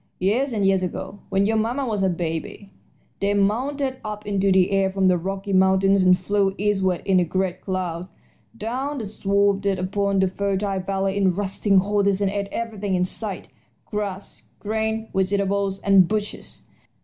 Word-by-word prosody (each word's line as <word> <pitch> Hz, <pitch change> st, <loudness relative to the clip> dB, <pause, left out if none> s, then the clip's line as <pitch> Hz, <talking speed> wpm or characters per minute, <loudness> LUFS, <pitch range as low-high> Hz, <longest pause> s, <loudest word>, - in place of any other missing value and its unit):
Years 235 Hz, +9 st, +1 dB
and 210 Hz, -4 st, 0 dB
years 195 Hz, -1 st, +3 dB
ago, 185 Hz, +2 st, -5 dB
when 195 Hz, +1 st, +2 dB
your 220 Hz, +1 st, +1 dB
mamma 240 Hz, +5 st, 0 dB
was 215 Hz, -5 st, -1 dB
a 190 Hz, -, +2 dB
baby, 170 Hz, +3 st, -4 dB, 0.5 s
they 200 Hz, +1 st, +1 dB
mounted 260 Hz, +7 st, 0 dB
up 210 Hz, -1 st, -6 dB
into 200 Hz, -1 st, +1 dB
the 185 Hz, 0 st, +4 dB
air 195 Hz, -1 st, +2 dB
from 190 Hz, 0 st, +1 dB
the 180 Hz, -, +4 dB
Rocky 195 Hz, +3 st, -3 dB
Mountains 190 Hz, +1 st, +4 dB
and 185 Hz, 0 st, +5 dB
flew 195 Hz, +1 st, 0 dB
eastward 195 Hz, -4 st, 0 dB
in 190 Hz, -2 st, +3 dB
a -, -, +3 dB
great 185 Hz, +1 st, -2 dB
cloud. 180 Hz, -2 st, -3 dB, 0.5 s
Down 260 Hz, +7 st, -3 dB
they 240 Hz, -, -4 dB
swooped 200 Hz, -1 st, +1 dB
upon 195 Hz, +1 st, 0 dB
the 190 Hz, 0 st, +3 dB
fertile 195 Hz, +1 st, -1 dB
valleys 195 Hz, +1 st, -1 dB
in 190 Hz, -3 st, +2 dB
rustling 195 Hz, 0 st, +1 dB
hordes, 200 Hz, -1 st, +1 dB
and 200 Hz, -1 st, +1 dB
ate 200 Hz, 0 st, -2 dB
everything 210 Hz, -4 st, -3 dB
in 180 Hz, 0 st, +2 dB
sight 200 Hz, 0 st, -3 dB, 0.4 s
grass, 200 Hz, -2 st, -5 dB, 0.2 s
grains, 220 Hz, +1 st, -2 dB
vegetables, 195 Hz, 0 st, 0 dB
and 195 Hz, -3 st, +5 dB
bushes. 210 Hz, +1 st, -4 dB
195 Hz, 165 wpm, -23 LUFS, 190-205 Hz, 0.5 s, and